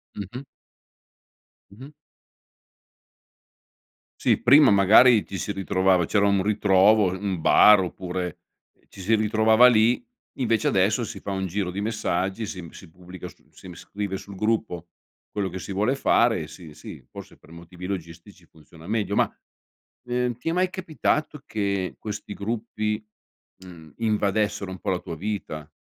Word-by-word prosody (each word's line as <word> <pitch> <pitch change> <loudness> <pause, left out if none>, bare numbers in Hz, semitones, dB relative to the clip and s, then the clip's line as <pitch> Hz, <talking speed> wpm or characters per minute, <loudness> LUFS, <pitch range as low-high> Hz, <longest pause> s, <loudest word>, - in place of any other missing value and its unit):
Mh-mh. 115 +7 -7 1.3
Mh-mh. 130 +8 -12 2.3
Sì, - - +1
prima 135 +2 +6
magari 105 +4 +6
ti 95 - -7
si 100 - -3
ritrovava 95 -2 +1
c'era 100 -1 +2
un 100 -1 +2
ritrovo, 100 0 +3
un 95 -1 -3
bar 105 +5 +6
oppure, 90 -1 -5 0.3
ehm, - - -37
ci - - -16
si 100 +4 0
ritrovava 110 +2 +4
lì, 120 - +3 0.4
invece 115 -4 +1
adesso 100 +5 +1
si 110 -3 -7
fa 100 - -8
un 95 -1 -2
giro 95 +1 -2
di 95 +3 -4
messaggi, 105 -1 -2
si 90 - -7
m 85 - -10
si 95 - -14
pubblica 90 +2 -11
su 85 - -18
si - - -14
m 90 - -10
scrive 100 +2 -5
sul 100 - -11
gruppo 105 -5 -2 0.4
quello 100 -2 -3
che 95 +1 -7
si 100 - -8
vuole 105 +6 +1
fare 115 -7 +2
e 75 - -7
sì, 80 -2 -12
sì, - - -11
forse - - -12
per 80 - -20
motivi 85 +2 -11
logistici 90 0 -8
funziona 80 +1 -17
meglio 105 -1 -1
ma, - - +2 0.7
ehm, 125 0 -1
ti 125 - -4
è - - 0
mai 185 +1 +1
capitato 155 -5 -2
che 100 -3 -2
questi 105 -1 -6
gruppi, 110 0 -3 0.6
mhmm, 80 -5 -13
invadessero 105 -3 -1
un 95 - -8
po' 100 - -4
la 90 - -1
tua 85 -2 -7
vita? 80 -5 -5
100 Hz, 155 wpm, -24 LUFS, 90-110 Hz, 2.3 s, prima